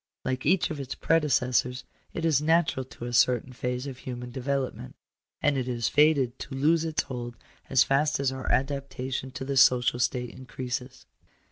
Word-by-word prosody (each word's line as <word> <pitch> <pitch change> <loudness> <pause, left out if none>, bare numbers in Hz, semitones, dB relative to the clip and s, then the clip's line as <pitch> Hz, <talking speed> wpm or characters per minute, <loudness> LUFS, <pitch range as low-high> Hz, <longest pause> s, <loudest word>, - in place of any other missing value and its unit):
Like 130 +1 -2
each 180 +1 +3
of 155 - -5
its 135 -1 -5
predecessors, 130 -5 +1 0.3
it 165 - -3
is 155 -3 +3
natural 160 -3 +2
to 120 - -9
a 120 - -5
certain 125 +2 +3
phase 125 +1 -3
of 135 -2 -7
human 125 -1 -6
development. 130 - -3 0.5
And 145 -2 +3
it 130 - -3
is 120 -2 -1
fated 140 -4 +3
to 135 - -6
lose 160 +4 +3
its 160 -1 -1
hold 120 -3 -6 0.3
as 135 - +5
fast 145 +2 +1
as 135 -2 +1
our 130 0 -4
adaptation 135 -1 -2
to 130 0 -6
the 140 0 -2
social 125 -1 +5
state 125 0 0
increases. 130 0 -6
130 Hz, 170 wpm, -27 LUFS, 125-140 Hz, 0.5 s, as